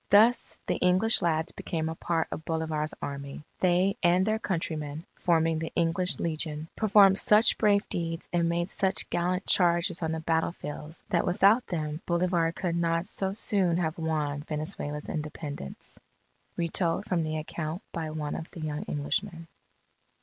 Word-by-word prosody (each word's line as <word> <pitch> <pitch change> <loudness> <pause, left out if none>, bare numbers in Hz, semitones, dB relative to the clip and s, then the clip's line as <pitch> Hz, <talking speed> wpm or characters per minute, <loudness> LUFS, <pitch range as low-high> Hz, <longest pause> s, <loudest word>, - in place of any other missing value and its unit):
Thus 225 +5 +4
the - - 0
English 185 +6 +4
lads 160 -2 0
became 160 -2 -3
a 160 - -2
part 165 0 -1
of 160 - -5
Bolivar's 160 -2 -2
Army. 140 +1 -6 0.2
They 185 +2 +2
and 180 +2 +4
their 215 +1 +1
countrymen, 160 -5 -3
forming 165 -2 +2
the 160 - -4
English 170 +2 +1
Legion, 155 -1 -2
performed 200 -2 +5
such 215 +2 +5
brave 205 -1 +3
deeds 165 0 -4
and 170 -1 +2
made 170 +2 -1
such 190 -1 +2
gallant 180 +2 0
charges 175 0 +2
on 160 -1 -1
the 160 - -2
battle 160 +1 0
fields, 150 0 -8
that - - +2
without 200 +7 +4
them 155 -3 -3
Bolivar 170 -1 +1
could 170 0 -2
not 165 0 +1
so 190 -1 -1
soon 195 -5 +2
have 165 -1 -2
won 150 -3 -1
Venezuela's 150 -1 -5
Independence. 150 - -6 0.6
_Retold 170 +2 0
from 180 -3 0
the 155 0 -2
account 160 +4 -5
by 160 -2 -3
one 155 -1 -4
of 165 - -6
the 170 - -10
young 150 -1 -3
Englishmen. 165 +3 -2
165 Hz, 155 wpm, -28 LUFS, 155-180 Hz, 0.6 s, performed